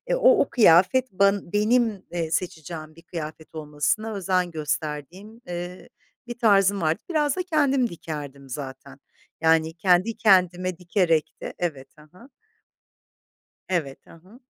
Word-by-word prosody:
o - - +5
o 280 - 0
kıyafet, 215 +4 +4
ban 200 -1 +1
benim, 215 -1 +1
eee, 170 -2 -3
seçeceğim 160 -2 -4
bir 165 - -16
kıyafet 160 -1 -8
olmasına 155 +9 -2
özen 185 -2 0
gösterdiğim, 160 - -5
eee, 175 +1 -7 0.4
bir 240 0 -6
tarzım 200 -3 +3
vardı. 160 +1 0
Biraz 300 -4 +1
da 365 - -2
kendim 280 -7 +1
dikerdim 145 -5 -8
zaten. 135 0 -8 0.4
Yani 160 0 +3
kendi 185 +6 +2
kendime 185 -4 +3
dikerek 170 -3 0
de - - -6
evet 150 -7 -4
ha 150 0 -17
ha. 230 +9 -17 1.4
Evet 155 -7 -3
ha 165 - -15
ha. 210 +7 -18
180 Hz, 130 wpm, -24 LUFS, 160-215 Hz, 1.4 s, o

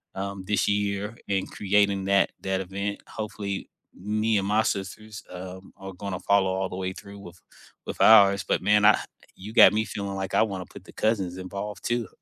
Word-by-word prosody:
um, 100 0 -5
this 105 -2 +1
year 105 +2 -1
in 95 -1 -1
creating 100 -1 +1
that 100 0 +3
that 95 0 -1
event. 100 +2 -4
Hopefully 105 -2 -5 0.2
me 110 +3 0
and 100 -1 -1
my 105 +2 +3
sisters, 105 +1 -4
um, 95 +1 -9
are 95 0 -9
gonna 95 0 -5
follow 100 -2 +2
all 95 0 -2
the - - -7
way 95 0 -3
through 100 +1 -11
with 90 -3 -12 0.5
with - - -6
ours, 100 -3 +7
but - - +1
man, 105 0 +3
I 110 - +6 0.4
you 105 +4 -10
got 120 - +8
me 110 +1 0
feeling 100 -1 -5
like 95 0 -4
I - - +5
wanna 95 -4 -4
put - - -13
the - - -14
cousins 100 -5 -1
involved, 100 +3 -6
too. 120 -1 -1
100 Hz, 190 wpm, -26 LUFS, 95-105 Hz, 0.5 s, got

